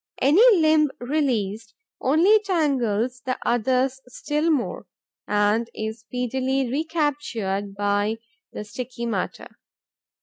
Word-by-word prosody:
Any 295 +10 +4 0.2
limb 310 -1 +4
released 230 -6 -2 0.3
only 340 +11 +4
tangles 255 - 0
the 255 0 -2
others 255 +3 +1
still 300 +5 -2
more 240 - -1 0.4
and 210 +3 +1
is 220 +1 -4
speedily 255 +2 -2
recaptured 275 - -2
by 205 +2 0 0.3
the - - -6
sticky 235 +3 -6
matter. 205 -6 -4
250 Hz, 100 wpm, -24 LUFS, 215-295 Hz, 0.4 s, Any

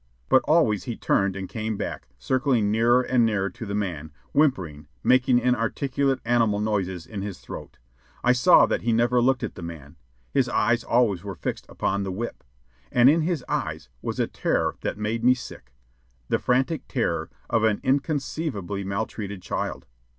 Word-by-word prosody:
But 130 - +6
always 145 - +3
he 120 - -3
turned 100 -1 +1
and 95 -1 -5
came 110 -2 -3
back, - - -5
circling 125 - +1
nearer 120 +3 +4
and 125 -1 +2
nearer 100 -4 +1
to 110 +4 -8
the 100 - -3
man, 85 -7 -3 0.2
whimpering, 90 - +1 0.2
making 130 0 +4
inarticulate 130 +2 0
animal 115 -3 +2
noises 95 -5 -1
in 105 -3 -6
his 100 -2 -5
throat. - - -9 0.5
I 125 - +5
saw 125 +8 +6
that - - -1
he 115 - +1
never 120 +2 +3
looked 130 +1 +2
at - - -3
the - - -10
man. 80 -4 -9 0.3
His 130 -3 +2
eyes 120 +1 +2
always 110 -7 +2
were 100 -2 -6
fixed - - -5
upon 100 +1 -1
the 95 -1 -3
whip, 115 +6 -5 0.5
and 125 +2 +6
in 165 +2 +2
his 160 -5 -1
eyes - - -3
was - - -4
a - - +3
terror - - -1
that - - -3
made 110 +2 -2
me 125 +1 +6
sick 65 - -10 0.6
the - - +2
frantic 130 +5 0
terror - - -1 0.2
of 115 -2 +1
an 110 -2 +2
inconceivably 135 - -1
maltreated 100 -1 -4
child. - - -3
115 Hz, 170 wpm, -25 LUFS, 100-125 Hz, 0.6 s, But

